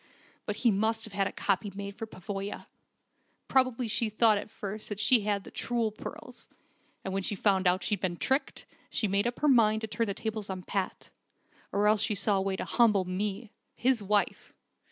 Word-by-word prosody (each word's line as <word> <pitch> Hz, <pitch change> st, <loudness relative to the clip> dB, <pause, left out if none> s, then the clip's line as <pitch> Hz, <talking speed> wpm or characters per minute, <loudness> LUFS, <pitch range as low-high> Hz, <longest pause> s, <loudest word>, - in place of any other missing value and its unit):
But -, -, -1 dB
he 235 Hz, -, +3 dB
must 220 Hz, +3 st, +1 dB
have 220 Hz, -, -9 dB
had 195 Hz, -1 st, +1 dB
this -, -, -8 dB
copy 200 Hz, +1 st, 0 dB
made 200 Hz, 0 st, -6 dB
for 225 Hz, 0 st, -6 dB
Pavoya. 195 Hz, 0 st, -6 dB, 0.8 s
Probably 255 Hz, -2 st, +2 dB
she 225 Hz, +1 st, 0 dB
thought 215 Hz, -1 st, +4 dB
at 210 Hz, -, -8 dB
first 210 Hz, 0 st, -6 dB
that 205 Hz, -1 st, -4 dB
she 230 Hz, +2 st, +5 dB
had 205 Hz, -2 st, 0 dB
the -, -, -12 dB
true 235 Hz, -2 st, -1 dB
pearls, 215 Hz, -, -9 dB, 0.6 s
and 190 Hz, -, -3 dB
when 195 Hz, -, 0 dB
she 205 Hz, -, -2 dB
found 195 Hz, -1 st, +2 dB
out 180 Hz, +1 st, +2 dB
how -, -, -3 dB
she'd 210 Hz, -3 st, 0 dB
been 175 Hz, -2 st, -2 dB
tricked, 265 Hz, -, -1 dB, 0.2 s
she 215 Hz, -, 0 dB
made 200 Hz, +3 st, +1 dB
up 240 Hz, -, -4 dB
her 300 Hz, -, +3 dB
mind 220 Hz, -5 st, +4 dB
to 220 Hz, -, -3 dB
turn 230 Hz, +1 st, -1 dB
the 200 Hz, -, -2 dB
tables 220 Hz, -2 st, -4 dB
on 185 Hz, -1 st, -5 dB
Pat. 195 Hz, 0 st, -3 dB, 0.6 s
Or 205 Hz, +1 st, +1 dB
else 210 Hz, -1 st, +4 dB
she 220 Hz, -1 st, +1 dB
saw 200 Hz, +1 st, +2 dB
a -, -, +1 dB
way 195 Hz, 0 st, -1 dB
to -, -, -4 dB
humble 210 Hz, -6 st, +3 dB
me 200 Hz, +4 st, -3 dB, 0.2 s
his 250 Hz, -2 st, +2 dB
wife. 205 Hz, +1 st, 0 dB
210 Hz, 210 wpm, -29 LUFS, 195-225 Hz, 0.8 s, she